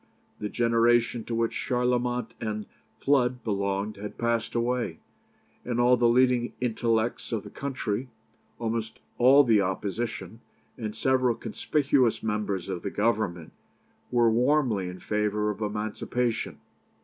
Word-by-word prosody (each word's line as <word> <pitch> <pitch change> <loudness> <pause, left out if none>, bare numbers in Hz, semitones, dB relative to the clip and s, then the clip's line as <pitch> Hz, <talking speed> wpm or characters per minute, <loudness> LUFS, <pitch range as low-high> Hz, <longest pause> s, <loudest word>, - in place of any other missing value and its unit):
The 105 - -3
generation 115 0 +2
to 115 - -3
which 115 0 +1
Charlemont 125 -1 0
and 105 -1 -3 0.3
Flood 125 -3 +2
belonged 100 0 -1
had 105 +1 -7
passed 115 -1 -1
away, 120 -7 0 0.7
and 120 -1 -2
all 125 +1 +5
the 120 -1 +3
leading 125 0 +3
intellects 115 -1 0
of 110 -4 -2
the - - -10
country, 130 -3 -3 0.5
almost 115 -1 -3 0.2
all 135 +4 +7
the 110 -5 +4
Opposition, 105 +4 -3 0.4
and 110 -2 -5
several 130 0 +2
conspicuous 130 -6 +1
members 105 -4 -2
of 85 - -4
the - - -3
Government, 100 -6 -1 0.6
were 120 -2 +4
warmly 120 -6 +2
in 90 - -8
favour 105 0 0
of 105 - -8
emancipation. 110 +3 -2
115 Hz, 125 wpm, -27 LUFS, 105-125 Hz, 0.7 s, all